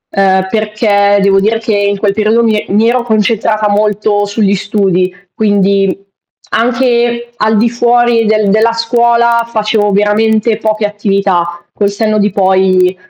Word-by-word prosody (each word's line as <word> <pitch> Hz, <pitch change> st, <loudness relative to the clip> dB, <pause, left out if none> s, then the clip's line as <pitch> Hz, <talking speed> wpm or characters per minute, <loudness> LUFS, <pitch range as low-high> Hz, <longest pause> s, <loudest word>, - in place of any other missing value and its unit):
Ehm, 190 Hz, -1 st, +2 dB
perché 210 Hz, -1 st, +1 dB
devo 195 Hz, 0 st, +3 dB
dire 220 Hz, +3 st, 0 dB
che 225 Hz, -1 st, -2 dB
in 200 Hz, 0 st, 0 dB
quel 200 Hz, 0 st, -1 dB
periodo 220 Hz, +2 st, +1 dB
mi 220 Hz, -2 st, +1 dB
e -, -, -8 dB
mi 215 Hz, +3 st, +2 dB
ero 250 Hz, +1 st, 0 dB
concentrata 215 Hz, -1 st, 0 dB
molto 205 Hz, 0 st, 0 dB
sugli 205 Hz, -1 st, 0 dB
studi, 190 Hz, -2 st, -1 dB, 0.2 s
quindi 195 Hz, -2 st, 0 dB, 0.5 s
anche 240 Hz, 0 st, 0 dB
al 220 Hz, 0 st, +1 dB
di 230 Hz, +2 st, +2 dB
fuori 240 Hz, -1 st, +1 dB
del 215 Hz, -1 st, +1 dB
della 220 Hz, +3 st, +2 dB
scuola 235 Hz, 0 st, +1 dB
facevo 215 Hz, -2 st, 0 dB
veramente 215 Hz, +2 st, +1 dB
poche 215 Hz, -1 st, -2 dB
attività. 195 Hz, -4 st, -2 dB
Col 200 Hz, -1 st, 0 dB
senno 215 Hz, +1 st, -1 dB
di 205 Hz, -, +1 dB
poi 190 Hz, -1 st, +1 dB
210 Hz, 145 wpm, -11 LUFS, 200-225 Hz, 0.5 s, devo